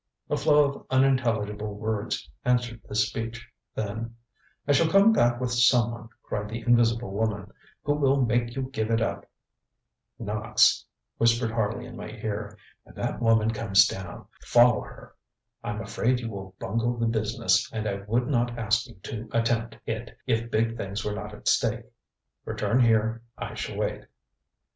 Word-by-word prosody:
ŌĆØ - - +2
A - - +2
flow 150 +2 +5
of 140 0 -3
unintelligible 115 -6 +1
words 110 -5 -3 0.2
answered 120 -2 0
this 105 0 +2
speech, 115 0 -6 0.3
then: 110 +2 -4 0.5
ŌĆ£I 145 - +4
shall 160 +3 +4
come 195 +5 +6
back 120 - +3
with 125 -1 -2
someone, 120 -2 +3
ŌĆØ - - -16
cried 105 0 -4
the 115 +2 -4
invisible 120 -2 +2
woman, 100 -1 -2 0.3
ŌĆ£who 145 0 +1
will 135 -2 +3
make 120 +1 0
you 135 - -2
give 110 -4 -2
it 115 0 +2
up! 115 - -2 0.9
ŌĆØ 115 - -6
ŌĆ£Knox, 105 +1 -4
ŌĆØ - - +5 0.3
whispered 115 0 +3
Harley 115 +2 -1
in 120 - -10
my 110 - -7
ear, 105 -1 -5 0.3
ŌĆ£when - - -16
that - - -3
woman 115 -1 +3
comes 100 -3 +4
down, 95 -2 -6 0.2
follow 120 -2 +5
her! - - -12 0.5
I'm - - -3
afraid 125 +1 0
you 115 -2 -5
will 95 -2 -8
bungle 115 +4 -1
the 115 - 0
business, 110 -2 +1
and 110 -1 -3
I 100 -1 -2
would 120 +3 +1
not 120 -3 0
ask 115 +2 +1
you 120 - -14
to 115 0 -6
attempt 115 0 0
it 115 +1 -5
if 115 -2 0
big 115 +1 0
things 100 -1 -4
were 105 - -1
not 105 0 -6
at - - -10
stake. - - +2 0.6
Return 125 - 0
here; 115 -1 +3 0.2
I - - -5
shall - - -5
wait. - - -2
115 Hz, 170 wpm, -27 LUFS, 110-120 Hz, 0.9 s, come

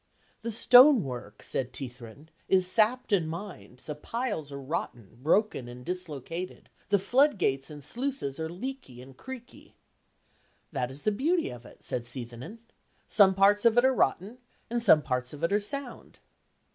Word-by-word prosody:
"The 230 - -4
stonework," 220 - +5
said 130 -1 -2
Teithrin, 125 +3 -9 0.2
"is 185 -1 +4
sapped 220 +6 +3
and 175 -6 +2
mined: 160 - -9
the 150 - -4
piles 205 - -4
are 140 - -6
rotten, 120 - -5
broken 165 - +1
and 125 +1 -10
dislocated: 175 0 -6 0.2
the 200 - +4
floodgates 195 - +1
and 145 -2 -10
sluices 240 - -4
are 160 0 -3
leaky 185 - -7
and 135 0 -15
creaky." 255 - -11 1.0
"That 125 - -2
is 135 +2 -11
the 215 - +2
beauty 320 - 0
of 120 -1 -11
it," - - -18
said 120 -1 -4
Seithenyn. 125 - -7 0.5
"Some 190 -3 +5
parts 200 +2 +4
of 230 0 +4
it 245 - +6
are 265 - +4
rotten, 220 0 0 0.3
and 240 0 0
some 160 -9 +6
parts 125 0 -2
of 150 +2 -10
it 170 - +1
are 205 - +4
sound." 270 +4 -4
175 Hz, 160 wpm, -28 LUFS, -, 1.0 s, it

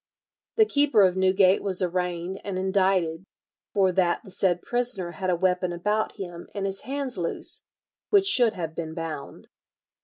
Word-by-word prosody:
"The 440 - +5
keeper 285 - +3
of 185 -1 +3
Newgate 190 0 +3
was 190 -2 +3
arraigned 180 0 -2
and 195 -2 -4
indicted 185 -3 0 0.5
for 190 -2 +2
that 180 -1 +1
the 195 - -12
said 180 -2 0
prisoner 240 -8 -1
had 185 +1 -4
a 180 - +2
weapon 180 0 0
about 210 +5 -1
him 175 -3 -8
and 200 -1 -2
his 195 0 0
hands 270 -5 -3
loose, 170 - 0 0.5
which 400 -2 +4
should 245 - +5
have 165 -4 -5
been 160 -1 -6
bound." 160 -4 -7
185 Hz, 160 wpm, -25 LUFS, 175-205 Hz, 0.5 s, The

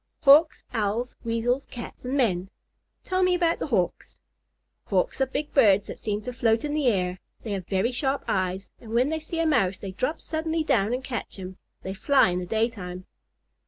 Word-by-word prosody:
"Hawks, 310 +2 +6
Owls, 225 +2 -1
Weasels, 235 +3 0
Cats, 245 0 -9
and 260 +3 -1
men." 190 -8 +1 0.5
"Tell 370 0 0
me 365 -1 +4
about 340 -1 +1
Hawks." - - -1 0.7
"Hawks - - 0
are 265 - +3
big 295 +3 -4
birds 205 -7 +5
who - - -5
seem 210 -1 -3
to 250 - -5
float 230 +1 +2
in 295 - -2
the 300 -3 +1
air. 180 -5 +1 0.2
They 220 - -5
have 190 -3 -3
very 195 +5 +1
sharp 270 +2 -1
eyes, 190 0 -1
and 225 -1 -9
when 250 +4 +3
they 320 0 -1
see 320 +2 -5
a 330 - +2
Mouse 220 - +2
they 195 -1 -6
drop 260 - -2
suddenly 320 0 -2
down 230 -8 +2
and 260 - -5
catch 255 -2 -5
him. 185 -1 -8 0.3
They 190 - -4
fly 270 +3 +4
in 180 0 -1
the 180 - -5
daytime." 200 -5 -2
235 Hz, 195 wpm, -26 LUFS, 195-285 Hz, 0.7 s, Hawks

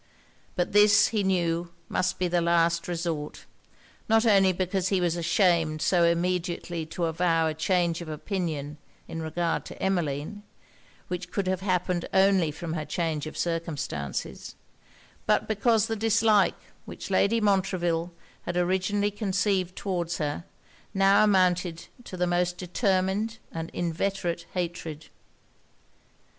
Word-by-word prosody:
But 175 - -1
this, 210 0 +6
he 220 -2 0
knew, 175 -3 0 0.2
must 185 - -1
be 180 - 0
the 175 0 +1
last 170 0 +2
resort; 165 -4 -4 0.6
not 225 +1 +4
only 195 -4 +5
because 185 +1 -1
he 190 -1 +1
was 175 -2 +1
ashamed 165 -2 +2
so 175 +2 +3
immediately 170 -1 -1
to 170 +1 -2
avow 165 0 +1
a 160 - 0
change 170 +1 0
of 170 - -7
opinion 155 -3 -4 0.3
in 165 - -5
regard 165 +1 -1
to - - -10
Emmeline, 175 0 -2 0.7
which 180 0 -4
could 195 +1 -2
have 185 0 -1
happened 180 -2 -1
only 190 -3 +4
from 160 +2 -5
her 155 -2 -2
change 155 0 -2
of - - -8
circumstances, 165 - -4 0.7
but - - +2
because 220 0 +2
the 225 - -2
dislike 220 -1 +3 0.3
which - - -8
Lady 200 +4 +3
Montreville 185 -4 +1 0.4
had 175 - -2
originally 190 +3 +1
conceived 195 -3 0
towards 175 -3 -2
her, 150 +1 -3 0.5
now 195 +2 +5
amounted 180 -4 +2 0.2
to 185 - -8
the 180 - +1
most 175 0 0
determined 190 +3 0
and 165 0 -5
inveterate 175 0 -2
hatred. 165 -4 -4
180 Hz, 130 wpm, -27 LUFS, 165-195 Hz, 0.7 s, this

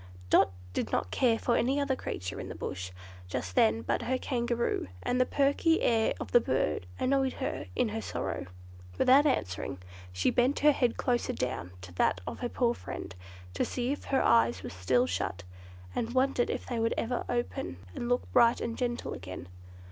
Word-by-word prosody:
Dot - - +6 0.2
did - - -2
not - - 0
care 235 -3 +3
for 235 - +1
any 265 +4 +2
other 280 -2 +1
creature 90 - -5
in - - -6
the - - -6
Bush 95 0 -4 0.4
just 90 0 -4
then 110 +4 +3
but - - 0
her 260 +1 0
Kangaroo, 240 - -1 0.2
and 250 +1 +1
the 255 - +3
perky 285 +4 +3
air 225 -2 +3
of - - -6
the 240 - +7
bird 90 - 0
annoyed 270 0 +2
her - - -4
in 250 -3 +2
her 225 +1 -3
sorrow. - - -3 0.5
Without 275 - +6
answering, 95 - -1 0.3
she 90 0 +1
bent 250 +4 +2
her 300 +1 +7
head 245 -4 +1
closer 245 -2 0
down 125 -8 -3
to 90 -1 -10
that 90 - +2
of - - -5
her 245 - -2
poor 240 -1 +1
friend, 95 - -7 0.4
to - - 0
see 245 +1 -1
if 290 - -4
her 270 - +2
eyes 115 -4 +4
were - - -5
still 95 +8 +2
shut, 90 -4 -3 0.5
and 235 +2 -2
wondered 260 -1 +2
if - - -3
they 240 -2 -3
would 230 0 +1
ever 240 +1 -1
open 240 - -2 0.2
and 240 - -4
look 245 0 +2
bright 235 -1 +5
and 230 0 -4
gentle 240 -1 -2
again. 95 +1 -7
235 Hz, 190 wpm, -30 LUFS, -, 0.5 s, the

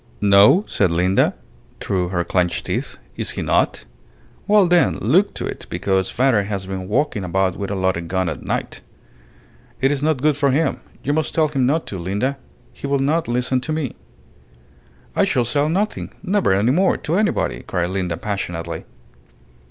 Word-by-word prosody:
"No?" 105 - +6
said 95 - +1
Linda, 90 +3 +2 0.4
through 90 -2 -1
her 90 -2 0
clenched 90 0 0
teeth. - - -3 0.2
"Is - - -2
he - - -1
not? - - +1 0.6
Well, 205 -1 +5
then, 170 - +3
look - - +2
to - - -4
it; - - -6
because 95 -1 0
father 125 -4 +2
has 100 -2 -4
been 95 -1 -5
walking 120 -1 0
about 95 +1 0
with 100 - -4
a 100 - -2
loaded 95 -3 -1
gun 95 +1 0
at 80 - -4
night." - - -3 1.0
"It 135 +3 +2
is 140 -2 -1
not 155 -2 +1
good 150 -1 +3
for 140 0 +2
him. 150 +5 +1 0.2
You 145 - 0
must 155 +1 -1
tell 155 -2 +3
him 135 -4 +1
not 160 +4 +1
to, 95 - -6
Linda. 105 +10 -2 0.3
He - - -6
will 140 0 +2
not 150 +5 +1
listen 125 +2 0
to 155 - -4
me." 155 -5 -2 1.2
"I - - +3
shall 125 -2 +1
say 145 +4 +1
nothing 195 +7 -1
never 200 - +1
any 100 +6 +3
more 185 +6 +3
to 160 - -4
anybody," 210 +3 0
cried 90 0 -2
Linda, 90 -3 -2
passionately. 85 -5 -4
115 Hz, 175 wpm, -21 LUFS, 95-150 Hz, 1.2 s, No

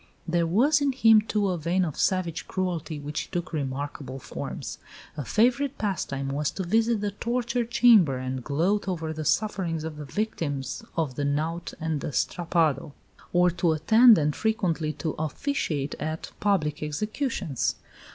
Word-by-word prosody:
There 170 0 +1
was 275 - +3
in 280 -2 +2
him, 225 -4 +6
too, 210 -2 0
a 180 -2 -1
vein 175 +4 +1
of 155 - -4
savage 180 -3 0
cruelty 170 -5 -3
which 145 +1 -4
took 175 -1 -4
remarkable 140 -2 -4
forms. 135 - -6 0.4
A 150 - -4
favourite 250 - +2
pastime 140 -9 -2
was 145 +1 0
to 190 - -4
visit 225 +4 +2
the 205 -1 -1
torture 235 +3 -1
chamber 225 - +5
and 130 0 -4
gloat 175 +10 0
over 165 -4 -2
the 155 0 -5
sufferings 170 -3 0
of 160 -1 -5
the 150 - -6
victims 145 - -3
of 155 -6 0
the 145 - -1
knout 155 +4 -2
and 160 -3 -2
the - - -4
strappado; 160 -5 0 0.4
or 180 0 +4
to 170 -1 +1
attend 220 +8 +6
(and 150 -1 +1
frequently 185 -9 0
to 160 - -3
officiate 155 - -2
at) 155 +2 -4
public 160 -8 +1
executions. 185 - -2
170 Hz, 155 wpm, -26 LUFS, 150-210 Hz, 0.4 s, him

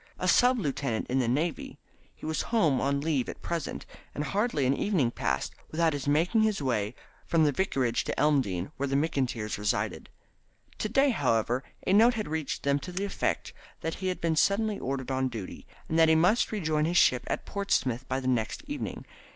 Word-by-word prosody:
A - - -2
sub 250 +1 +5
lieutenant 135 - -2
in 130 - +2
the 125 - +1
Navy, 150 +7 -1 0.4
he - - -11
was 155 0 -1
home 165 - +2
on 140 +1 0
leave 145 -5 0
at - - -9
present, 170 -4 -4 0.3
and 145 - -2
hardly 195 - 0
an 135 +2 +3
evening 160 - +1
passed 70 - -2 0.2
without 160 0 +1
his 145 -1 -4
making 165 +10 +3
his 215 -2 +2
way 120 -5 -1 0.3
from 165 -2 +3
the 150 - +4
Vicarage 135 -7 0
to - - -3
Elmdene, 135 -9 +1
where 140 - -1
the 135 - -1
McIntyres 130 -8 -1
resided. 105 0 -1 0.7
To 215 - -1
day, 270 +4 +4
however, 125 - +1 0.2
a 185 - +2
note 230 +4 +6
had 215 - -3
reached 155 -1 -3
them 140 0 +2
to 180 - -8
the 190 +3 -2
effect 200 - -2 0.3
that 160 - -2
he 190 - -1
had 185 - -2
been 165 -1 0
suddenly 205 +5 +2
ordered 135 0 -3
on 130 0 +1
duty, 110 -6 -8 0.2
and 160 - 0
that 160 0 +6
he 160 - +5
must 180 +9 +3
rejoin 160 -7 0
his 175 +2 +1
ship 125 -5 +4
at - - -3
Portsmouth 130 - -1
by 130 +1 -1
the 130 - -4
next 120 - -1
evening. 290 0 -5
150 Hz, 200 wpm, -28 LUFS, 130-185 Hz, 0.7 s, note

